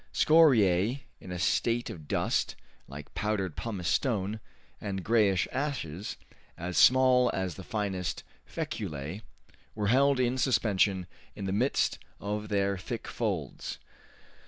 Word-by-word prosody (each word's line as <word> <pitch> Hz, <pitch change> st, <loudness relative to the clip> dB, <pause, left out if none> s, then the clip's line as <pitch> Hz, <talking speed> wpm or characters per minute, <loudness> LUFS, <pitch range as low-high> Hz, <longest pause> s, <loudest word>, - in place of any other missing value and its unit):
Scoriae, 125 Hz, -, +4 dB, 0.2 s
in 90 Hz, -, -10 dB
a 90 Hz, -, -3 dB
state 115 Hz, +5 st, +1 dB
of 75 Hz, -3 st, -10 dB
dust, -, -, 0 dB, 0.3 s
like 70 Hz, +2 st, -10 dB
powdered 100 Hz, -3 st, -1 dB
pumice 100 Hz, -7 st, -4 dB
stone, 105 Hz, -, 0 dB, 0.4 s
and 95 Hz, -3 st, -3 dB
grayish 105 Hz, -5 st, +3 dB
ashes 120 Hz, -, -3 dB, 0.4 s
as 85 Hz, +2 st, -4 dB
small 130 Hz, -1 st, +6 dB
as 95 Hz, -2 st, -2 dB
the 95 Hz, -, -9 dB
finest 95 Hz, -6 st, -3 dB, 0.2 s
feculae, 75 Hz, +7 st, -5 dB, 0.5 s
were 105 Hz, -2 st, 0 dB
held 135 Hz, +2 st, +4 dB
in 125 Hz, +1 st, +1 dB
suspension 105 Hz, -7 st, +2 dB, 0.3 s
in 100 Hz, -, -5 dB
the 95 Hz, -, -1 dB
midst 125 Hz, +7 st, +1 dB, 0.2 s
of 105 Hz, +1 st, -4 dB
their 100 Hz, -2 st, +1 dB
thick 90 Hz, -, -5 dB
folds. -, -, -3 dB
105 Hz, 125 wpm, -29 LUFS, 95-120 Hz, 0.5 s, small